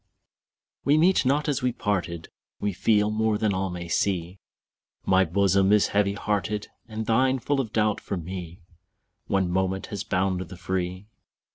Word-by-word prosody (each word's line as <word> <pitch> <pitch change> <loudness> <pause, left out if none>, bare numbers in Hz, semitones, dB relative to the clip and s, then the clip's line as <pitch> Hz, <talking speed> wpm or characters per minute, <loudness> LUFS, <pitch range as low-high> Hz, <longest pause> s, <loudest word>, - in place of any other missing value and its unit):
We 145 +2 +4
meet 170 -3 +4
not 145 +3 +2
as 145 -3 0
we 125 0 +1
parted, 90 -7 -2 0.3
We 105 -1 -1
feel 105 +3 +2
more 110 0 +1
than 105 -1 +1
all 95 +1 -1
may 90 -1 -6
see; 90 0 -1 0.7
My 95 0 +4
bosom 95 +2 +2
is 105 -1 +4
heavy 100 -1 +2
hearted, 105 0 -2 0.2
And 110 -1 -5
thine 130 +4 +3
full 135 +2 0
of 115 -5 -6
doubt 105 -2 +1
for 100 - -4
me: 90 0 -7 0.7
One 95 -2 +1
moment 95 +1 0
has 100 - -3
bound 95 -1 0
the 90 0 -8
free. 90 +1 -3
100 Hz, 160 wpm, -26 LUFS, 95-110 Hz, 0.7 s, We